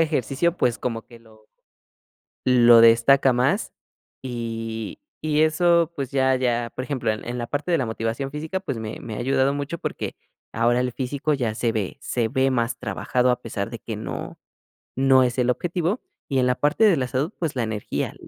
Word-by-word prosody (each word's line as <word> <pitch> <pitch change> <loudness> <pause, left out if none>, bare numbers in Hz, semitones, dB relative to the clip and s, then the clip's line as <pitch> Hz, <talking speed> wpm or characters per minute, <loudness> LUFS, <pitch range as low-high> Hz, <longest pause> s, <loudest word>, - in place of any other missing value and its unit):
ejercicio, 160 +2 +1
pues, 120 -1 +1
como 115 -2 -3
que 120 -1 -14
lo 110 -1 -21 1.0
lo 120 -2 +7
destaca 120 +4 +6
más. 125 +2 +1 0.5
Y 115 -3 -5 0.2
y 155 0 +2
eso, 170 +1 +3
pues 135 -3 -3
ya 130 -1 +2
ya 120 -2 0
por 130 - -4
ejemplo, 130 -6 -1
en 110 - -4
en 120 - -3
la 120 - -3
parte 145 +7 -3
de 170 - +3
la 130 - -1
motivación 115 +4 -3
física, 155 +6 -4
pues, 135 - -4
me 110 -1 -6
me 110 - -7
ha - - -5
ayudado 135 +2 +1
mucho, 145 +4 -4
porque - - -4 0.4
ahora 120 +2 +2
el 125 -1 -1
físico 135 +4 -2
ya 120 -6 -1
se 115 0 0
ve 105 -1 -3
se 120 -4 -1
ve 130 +3 +1
más 120 -2 0
trabajado, 125 0 0
a 125 - 0
pesar 110 -2 -4
de 115 - -6
que 110 -2 -6
no 110 - -6 0.6
no 130 0 +5
es 125 0 -1
el 125 0 +2
objetivo, 175 - -1 0.3
y 135 - 0
en 125 - +3
la 125 - +3
parte 150 +9 +1
de 195 -8 +6
la 130 - -1
salud, 135 - -1
pues, 160 -5 -2
la 125 - 0
energía. 110 -2 -3
125 Hz, 195 wpm, -23 LUFS, 115-140 Hz, 1.0 s, lo